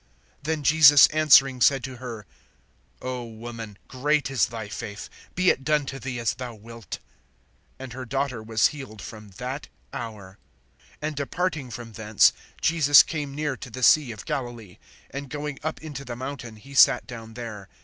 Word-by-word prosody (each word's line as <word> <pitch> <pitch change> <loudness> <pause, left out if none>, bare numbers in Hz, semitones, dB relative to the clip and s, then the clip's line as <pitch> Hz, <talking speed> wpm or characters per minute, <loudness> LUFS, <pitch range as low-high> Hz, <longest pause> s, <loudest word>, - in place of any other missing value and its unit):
(28)Then 155 -1 -1
Jesus 145 -2 +8
answering 135 -4 +5
said 135 0 +4
to 130 -2 -6
her: 120 -4 -7 0.8
O 125 -1 -3
woman, 115 -2 -8
great 135 0 0
is 135 - +2
thy 110 -2 -6
faith; 105 0 -7 0.3
be 185 0 +4
it 135 - -4
done 150 0 +2
to 135 0 -6
thee 125 -1 -5
as 115 -2 0
thou 125 -2 -7
wilt. 115 -2 -9 0.8
And 130 -2 -8
her 130 +1 -6
daughter 130 -1 -2
was 110 -3 +2
healed 135 -8 -9
from 105 0 -10
that 130 +3 -5 0.3
hour. 105 -4 -7 0.6
(29)And 155 0 -1
departing 150 0 -2
from 120 -1 -8
thence, 110 -1 +4 0.3
Jesus 150 -3 +7
came 145 -3 -5
near 150 -2 -1
to 125 - -9
the 130 +3 -7
sea 135 0 +5
of 110 - -9
Galilee; 120 -8 -5 0.3
and 140 0 -6
going 145 0 -5
up 155 +1 -3
into 145 -3 -6
the 125 -3 -6
mountain, 130 -3 -6
he 135 +6 -14
sat 135 - +6
down 115 -2 -9
there. 110 -5 -7
130 Hz, 170 wpm, -25 LUFS, 115-140 Hz, 0.8 s, Jesus